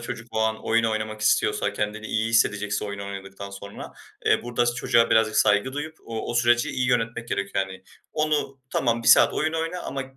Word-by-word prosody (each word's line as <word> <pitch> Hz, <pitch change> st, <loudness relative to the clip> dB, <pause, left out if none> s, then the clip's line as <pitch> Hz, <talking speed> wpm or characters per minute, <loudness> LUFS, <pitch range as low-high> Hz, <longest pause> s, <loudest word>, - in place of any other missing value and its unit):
Çocuk 115 Hz, -1 st, -6 dB
o 110 Hz, -, -1 dB
an 110 Hz, 0 st, -1 dB
oyun 115 Hz, +1 st, +2 dB
oynamak 110 Hz, -1 st, -2 dB
istiyorsa, 110 Hz, -, +2 dB
kendini 105 Hz, +1 st, -3 dB
iyi 110 Hz, +1 st, 0 dB
hissedecekse 105 Hz, -3 st, +1 dB
oyun 100 Hz, -1 st, -5 dB
oynadıktan 100 Hz, 0 st, -7 dB
sonra, 100 Hz, +1 st, -9 dB, 0.3 s
eee, -, -, +3 dB
burada 120 Hz, 0 st, 0 dB
s 120 Hz, -, +1 dB
çocuğa 115 Hz, -1 st, +2 dB
birazcık 110 Hz, -1 st, +3 dB
saygı 105 Hz, +5 st, +3 dB
duyup 150 Hz, +3 st, -5 dB
o 115 Hz, -1 st, -5 dB
o -, -, -4 dB
süreci 120 Hz, 0 st, +3 dB
iyi 125 Hz, -1 st, -1 dB
yönetmek 120 Hz, -1 st, -1 dB
gerekiyor 100 Hz, 0 st, -1 dB
yani. 95 Hz, 0 st, -11 dB, 0.3 s
Onu, 150 Hz, -3 st, -1 dB
"Tamam 115 Hz, -2 st, 0 dB
1 -, -, +2 dB
saat -, -, +7 dB
oyun 155 Hz, +1 st, 0 dB
oyna 165 Hz, +2 st, -2 dB
ama 135 Hz, 0 st, -4 dB
115 Hz, 195 wpm, -25 LUFS, 105-120 Hz, 0.3 s, saat